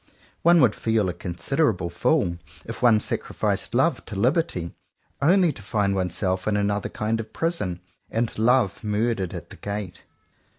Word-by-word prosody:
One 170 +1 +6
would 120 -5 +5
feel 110 -4 0
a - - -2
considerable 90 - -1
fool 85 - +1 0.3
if 115 - -7
one 115 -3 +5
sacrificed - - -2
"love" - - +2
to - - -7
"liberty," 120 - 0 0.5
only 175 +2 +4
to 110 - -10
find 100 -1 0
oneself 95 0 -1
in 105 -1 +2
another 100 0 0
kind 110 +1 -2
of 110 -1 -7
prison, 165 - -2 0.3
and 115 0 -1
"love" 120 -2 +2
murdered 105 -3 -1
at 85 -1 -8
the - - -10
gate. 100 -4 -5
105 Hz, 155 wpm, -24 LUFS, 95-120 Hz, 0.5 s, One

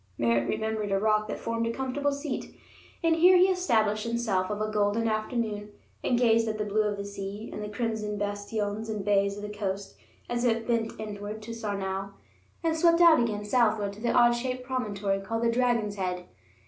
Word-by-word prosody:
Merritt 115 0 +1
remembered 220 -2 -2
a 195 - +3
rock 215 +1 +2
that - - -4
formed 230 0 -2
a - - 0
comfortable 265 +3 -1
seat, 280 -1 -5 0.5
and 330 -1 +4
here 360 +2 +7
he 360 - +6
established 230 - +2
himself 220 -6 0
of 210 0 -3
a 215 0 -1
golden 210 +2 +1
afternoon, 215 -1 -2 0.3
and 245 - +2
gazed 230 -2 +3
at 215 -1 -2
the 210 - -2
blue 210 +1 +1
of 205 -1 -2
the 200 - -5
sea 200 +2 -6
and - - -5
the 210 - -5
crimson 210 -1 -2
bastions 205 +1 -3
and 210 -2 -3
bays 200 -1 +2
of 205 - -7
the 210 0 -6
coast 200 -1 -4 0.3
as 240 0 -2
it 230 -2 +1
bent 230 -2 -1
inward 210 0 -6
to 230 - -7
Sarnau 195 -3 -3 0.5
and 325 -1 +1
swept 335 +1 +4
out 335 -4 +7
again 210 -3 -1
southward 210 -3 +2
to 210 - -12
the 240 - +1
odd 240 -1 +6
shaped 250 +1 -2
promontory 210 -6 -1
called 225 +4 -3
the 230 - +3
Dragon's 230 -4 +1
Head. 180 -1 -2
215 Hz, 200 wpm, -28 LUFS, 205-235 Hz, 0.5 s, here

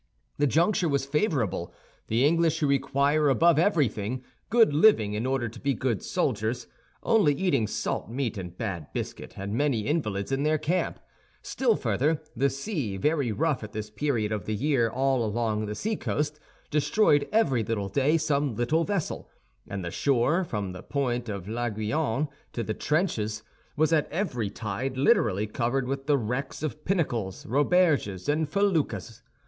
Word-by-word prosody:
The 145 - +4
juncture 170 +3 +2
was 140 -1 0
favorable. 135 - 0 0.4
The 115 +5 +2
English, 165 +1 +3
who 150 - +1
require, 140 +2 +2
above 160 +3 +4
everything, 130 - +1 0.3
good 225 -9 +5
living 145 - +5
in 110 +4 -1
order 130 -2 0
to 115 +1 -10
be 140 +1 0
good 120 -7 -1
soldiers, - - -1 0.4
only 205 -11 +4
eating 140 - +1
salt - - -3
meat 125 -1 -2
and 90 -3 -7
bad 90 -9 -4
biscuit, - - -5
had 100 +1 -5
many 125 0 +1
invalids 105 -6 -1
in 135 +1 0
their 155 +1 +2
camp. 165 +5 -1 0.4
Still 245 -4 +1
further, 140 - +1 0.2
the 135 +4 +2
sea, 135 - -3
very 145 +1 +1
rough 150 +2 0
at 105 - -8
this 105 0 -5
period 110 -3 -1
of 105 -4 -3
the 110 - -2
year 125 -1 +2
all 130 +1 +1
along 110 -1 -1
the 105 - -4
sea 215 - -1
coast, 150 -4 -2 0.3
destroyed 150 0 +3
every 140 - +3
day 115 +8 +1
some 145 -5 0
little 150 +9 +1
vessel; 200 -2 -3 0.4
and 100 -2 -5
the 85 - -4
shore, 140 - +2
from 105 - -3
the 90 - -8
point 125 -4 -2
of 100 -3 -5
l'Aiguillon 115 +5 -1 0.3
to 115 - -2
the 110 - -2
trenches, 110 - -1 0.3
was 155 +2 +3
at 150 -2 +1
every 135 - -1
tide 115 +6 -4
literally 110 -6 +3
covered 120 +4 -1
with 135 +1 -3
the 145 -2 +4
wrecks 125 +5 -3
of 150 0 -4
pinnacles, 120 - -1
roberges, 145 - +2
and 150 +1 +1
feluccas. 155 - 0
135 Hz, 160 wpm, -27 LUFS, 110-155 Hz, 0.4 s, good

